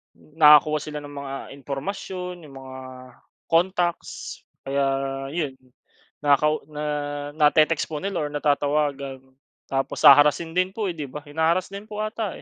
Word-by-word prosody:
nakakuha 150 Hz, -1 st, +5 dB
sila 150 Hz, -1 st, -6 dB
ng 145 Hz, 0 st, -10 dB
mga 140 Hz, -1 st, -6 dB, 0.2 s
impormasyon, 180 Hz, +5 st, -5 dB
'yung 140 Hz, -3 st, -13 dB
mga 130 Hz, 0 st, -10 dB, 0.7 s
contacts 175 Hz, 0 st, -1 dB, 0.2 s
kaya 140 Hz, 0 st, +1 dB, 0.5 s
'yun, 150 Hz, -5 st, -2 dB, 0.6 s
nakakau 150 Hz, +1 st, +3 dB
na 150 Hz, 0 st, -6 dB, 0.5 s
na-te-text 155 Hz, +1 st, +3 dB
po 155 Hz, -, -4 dB
nila 195 Hz, -5 st, -2 dB
or -, -, -8 dB
natatawagan 145 Hz, -2 st, 0 dB, 0.5 s
tapos 135 Hz, +3 st, -2 dB
haharassin 145 Hz, +3 st, +7 dB
din 185 Hz, +2 st, 0 dB
po, 210 Hz, -4 st, -1 dB
eh, 170 Hz, -, -10 dB
'di 150 Hz, -3 st, -5 dB
ba? 145 Hz, +3 st, -8 dB
Hina-harass 160 Hz, +5 st, 0 dB
din 200 Hz, +2 st, -8 dB
po 215 Hz, -1 st, -4 dB
'ata, 215 Hz, -1 st, -3 dB
150 Hz, 135 wpm, -24 LUFS, 145-175 Hz, 0.7 s, haharassin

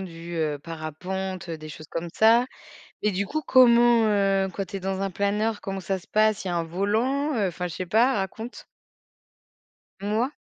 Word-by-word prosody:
du, 170 Hz, -2 st, -8 dB
heu, 155 Hz, -3 st, -1 dB
parapente, 175 Hz, +4 st, -5 dB
des 155 Hz, -1 st, -6 dB
choses 155 Hz, +1 st, -10 dB
comme 165 Hz, +2 st, -4 dB
ça 230 Hz, +3 st, +5 dB, 0.6 s
et 210 Hz, -, +2 dB
du 195 Hz, +1 st, -1 dB
coup, 310 Hz, +6 st, -3 dB
comment, 240 Hz, -3 st, +6 dB
heu, 195 Hz, -2 st, +2 dB
quand 195 Hz, -, -2 dB
tu 200 Hz, -, -6 dB
es -, -, -5 dB
dans 190 Hz, +1 st, -2 dB
un 195 Hz, -, -1 dB
planeur, 205 Hz, +3 st, 0 dB
comment 195 Hz, -1 st, -4 dB
ça 190 Hz, +1 st, -2 dB
se -, -, -18 dB
passe? 215 Hz, -2 st, +2 dB
Il -, -, -3 dB
y -, -, -1 dB
a 175 Hz, -, -1 dB
un 170 Hz, -, 0 dB
volant? 225 Hz, -, 0 dB
Heu, 200 Hz, -4 st, +1 dB
enfin, 180 Hz, +1 st, -4 dB
je 165 Hz, -, -6 dB
sais 185 Hz, -, -4 dB
pas, 230 Hz, +8 st, +3 dB
raconte! 220 Hz, +4 st, -5 dB, 1.4 s
Moi 215 Hz, +5 st, 0 dB
195 Hz, 195 wpm, -25 LUFS, 175-220 Hz, 1.4 s, comment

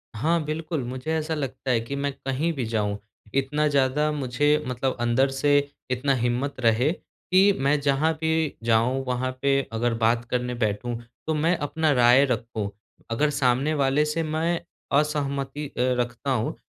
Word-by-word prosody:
हाँ, 160 Hz, +8 st, +1 dB
बिल्कुल। 155 Hz, -1 st, -3 dB
मुझे 130 Hz, +5 st, -4 dB
ऐसा 160 Hz, 0 st, -1 dB
लगता 135 Hz, -2 st, -3 dB
है 120 Hz, -, +3 dB
कि 115 Hz, +5 st, -5 dB
मैं 140 Hz, 0 st, -1 dB
कहीं 135 Hz, +6 st, -2 dB
भी 130 Hz, -6 st, -3 dB
जाऊँ 105 Hz, -2 st, 0 dB, 0.4 s
इतना 145 Hz, +3 st, +1 dB
ज़्यादा 145 Hz, +1 st, +2 dB
मुझे 145 Hz, +1 st, +1 dB
मतलब 125 Hz, +1 st, -1 dB
अंदर 120 Hz, +3 st, +2 dB
से 145 Hz, +2 st, +3 dB, 0.3 s
इतना 130 Hz, +2 st, +1 dB
हिम्मत 125 Hz, +3 st, -1 dB
रहे 120 Hz, +4 st, +3 dB
कि 190 Hz, +2 st, +1 dB
मैं 140 Hz, +2 st, +2 dB
जहाँ 140 Hz, +3 st, +2 dB
भी 160 Hz, -1 st, 0 dB
जाऊँ 120 Hz, +3 st, +2 dB
वहाँ 125 Hz, +1 st, -1 dB
पे 140 Hz, 0 st, +3 dB
अगर 120 Hz, +1 st, 0 dB
बात 115 Hz, +1 st, +2 dB
करने 125 Hz, 0 st, -1 dB
बैठूँ, 115 Hz, +1 st, -1 dB, 0.3 s
तो 160 Hz, -, +1 dB
मैं 160 Hz, +3 st, +2 dB
अपना 155 Hz, +1 st, 0 dB
राय 125 Hz, +1 st, +6 dB
रखूँ। 115 Hz, -5 st, -2 dB, 0.4 s
अगर 145 Hz, +6 st, +2 dB
सामने 135 Hz, +1 st, +1 dB
वाले 140 Hz, 0 st, +2 dB
से 160 Hz, +2 st, -1 dB
मैं 160 Hz, +2 st, 0 dB, 0.4 s
असहमति 145 Hz, -1 st, -2 dB
अ, -, -, -18 dB, 0.3 s
रखता 120 Hz, +3 st, -2 dB
हूँ 120 Hz, -3 st, -1 dB
135 Hz, 160 wpm, -25 LUFS, 125-150 Hz, 0.4 s, राय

